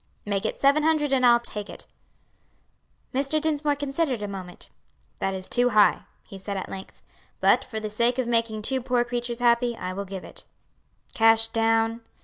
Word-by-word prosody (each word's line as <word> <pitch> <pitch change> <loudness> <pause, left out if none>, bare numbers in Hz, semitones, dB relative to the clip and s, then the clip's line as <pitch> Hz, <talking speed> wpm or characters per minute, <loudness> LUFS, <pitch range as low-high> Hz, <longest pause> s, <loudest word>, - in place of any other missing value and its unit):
"Make 200 +1 -1
it - - -4
seven 280 +2 +4
hundred 305 -2 +1
and 260 -1 +2
I'll 240 -1 +6
take 210 -3 -4
it." - - -10 1.3
Mr. 275 +4 +1
Dinsmore 300 -2 0
considered 275 -4 -2
a - - -3
moment. 185 -3 -9 0.5
"That 195 0 -1
is 185 0 -5
too 245 0 +2
high," 210 -3 +3 0.2
he 195 - -11
said 200 +1 -4
at 190 - -5
length, 190 0 -10 0.4
"but - - +4
for 220 -3 -6
the 215 - -4
sake 235 +4 0
of 255 - 0
making 230 -2 0
two 260 +3 0
poor 245 -1 +1
creatures 240 0 -4
happy, 235 0 +2
I 185 0 -5
will 200 +1 -5
give 190 -1 -7
it." - - -12 0.7
"Cash 225 0 +4
down?" 225 0 +1
235 Hz, 180 wpm, -25 LUFS, 210-255 Hz, 1.3 s, I'll